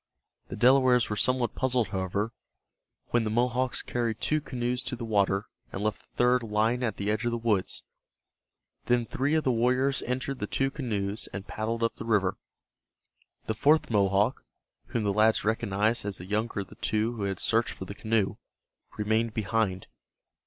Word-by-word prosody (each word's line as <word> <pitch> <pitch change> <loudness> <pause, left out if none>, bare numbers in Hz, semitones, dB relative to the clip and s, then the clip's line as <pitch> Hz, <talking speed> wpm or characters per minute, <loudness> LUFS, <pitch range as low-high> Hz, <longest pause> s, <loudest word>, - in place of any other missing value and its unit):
The - - -6
Delawares 125 -2 +4
were - - 0
somewhat 125 +3 +1
puzzled, 125 -4 +1
however, 100 +2 -2 0.8
when 120 -1 +2
the 110 - -1
Mohawks 125 +3 +1
carried 115 -2 -2
two 155 +4 +1
canoes 125 -2 -2
to - - -2
the 120 -1 -6
water, 100 -2 +1 0.3
and 95 - -4
left 105 -1 -1
the - - -34
third 125 +1 +4
lying 110 +2 +1
at 115 -5 -1
the 100 +1 0
edge 110 +2 -1
of 120 - +1
the 120 - -1
woods. 110 -5 0 1.0
Then 120 -1 +2
three 140 +6 0
of 155 - +2
the 130 - +2
warriors 125 +3 +2
entered 130 +2 -3
the 105 - -2
two 135 +4 0
canoes 105 -6 -3
and 100 -1 -6
paddled 115 +2 -3
up 115 - 0
the - - -6
river. 105 -5 +1 1.1
The 110 - -1
fourth 150 +5 +3
Mohawk, 100 +3 +2 0.4
whom 115 - -2
the 100 -1 +1
lads 110 +2 +3
recognized 110 0 +1
as 100 -1 -3
the 90 - -8
younger 105 +1 -1
of 95 - -9
the - - -13
two 110 +2 0
who 105 -4 -3
had 95 -1 -2
searched 115 0 +1
for 95 - -7
the 100 - -7
canoe, 110 -1 0 0.6
remained 110 +1 0
behind. 105 -3 0
115 Hz, 180 wpm, -28 LUFS, 105-125 Hz, 1.1 s, Delawares